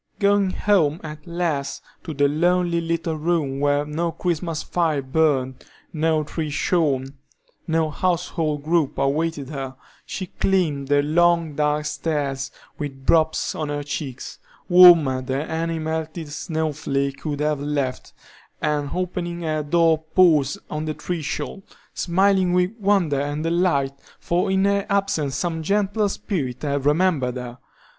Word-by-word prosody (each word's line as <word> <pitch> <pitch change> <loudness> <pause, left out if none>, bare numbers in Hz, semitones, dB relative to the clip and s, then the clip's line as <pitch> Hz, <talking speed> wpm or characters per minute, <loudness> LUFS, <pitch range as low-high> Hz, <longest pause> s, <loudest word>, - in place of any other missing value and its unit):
Going 200 -1 +3
home, 180 -6 +2
at 155 +2 -9
last, 165 -5 -2 0.2
to 160 -4 -5
the 145 0 +3
lonely 170 +3 +1
little 165 0 -1
room 155 -4 0
where 145 0 +2
no 165 +3 -2
Christmas 165 -1 -2
fire 160 -5 0
burned, 130 -2 0 0.3
no 160 -1 +1
tree 155 +1 -4
shone, 145 -4 0 0.5
no 160 -1 +1
household 165 -3 -1
group 160 -2 +1
awaited 140 +1 -1
her, 135 -3 -5 0.3
she 190 - -5
climbed 165 -7 0
the 145 0 +3
long, 170 +1 +2
dark 150 +1 0
stairs, 145 -2 -2 0.3
with 135 -3 -6
drops 160 -1 +2
on 155 -2 -3
her 145 0 -3
cheeks, 140 -3 -6 0.3
warmer 170 -8 +7
than 130 +2 -2
any 165 0 -2
melted 160 0 -4
snow 155 +1 -2
flake 140 -1 -2
could 145 -2 -3
have 150 -1 0
left, 140 -3 -2 0.5
and 150 -2 -1
opening 175 -1 -3
her 155 -2 -1
door 165 +1 +3 0.2
paused 155 -7 +4
on 155 +1 -4
the 155 -1 -3
threshold, 160 0 -4 0.3
smiling 190 0 +2
with 180 +1 +2
wonder 190 -9 +2
and 145 +2 -3
delight, 165 -5 +1 0.3
for 175 +2 0
in 190 0 +2
her 200 0 +2
absence 195 -9 0
some 160 +3 -2
gentle 205 +4 +1
spirit 140 - -4
had 140 -1 -1
remembered 150 -6 +2
her. 125 0 -7
155 Hz, 140 wpm, -23 LUFS, 145-175 Hz, 0.5 s, warmer